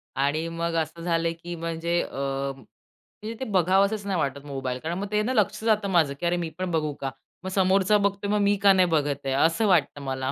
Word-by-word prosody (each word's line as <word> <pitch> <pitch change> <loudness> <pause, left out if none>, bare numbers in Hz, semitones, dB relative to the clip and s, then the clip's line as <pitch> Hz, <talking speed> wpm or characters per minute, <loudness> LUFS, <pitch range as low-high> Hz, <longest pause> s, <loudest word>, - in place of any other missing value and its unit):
आणि 145 +4 0
मग 165 0 -3
असं 160 +2 -7
झालंय 165 -1 0
की 170 +1 -8
म्हणजे 165 +1 -1
अ, - - -7 1.1
म्हणजे 220 - -4
ते 260 - -3
बघावसंच 195 +3 +2
नाही 190 -3 -1
वाटत 140 -1 -2
मोबाईल. 135 -3 -4
कारण 165 +5 -4
मग 200 +2 -3
ते 210 0 +2
ना, 255 - -1
लक्ष 215 -1 +1
जातं 215 -3 +2
माझं 160 -6 +3
की, - - -3
अरे 175 +1 +1
मी 170 -2 -3
पण 185 -1 -2
बघू 155 -2 0
का? 135 -1 -2 0.3
मग 190 - -4
समोरचा 190 +2 +3
बघतोय 200 0 -1
मग 210 - +2
मी 200 0 +3
का 200 -1 +7
नाही 185 -1 +4
बघत 145 -3 0
आहे? 135 - 0
असं 165 +10 +2
वाटतं 160 -5 +2
मला. 130 -1 -3
170 Hz, 220 wpm, -25 LUFS, 150-195 Hz, 1.1 s, का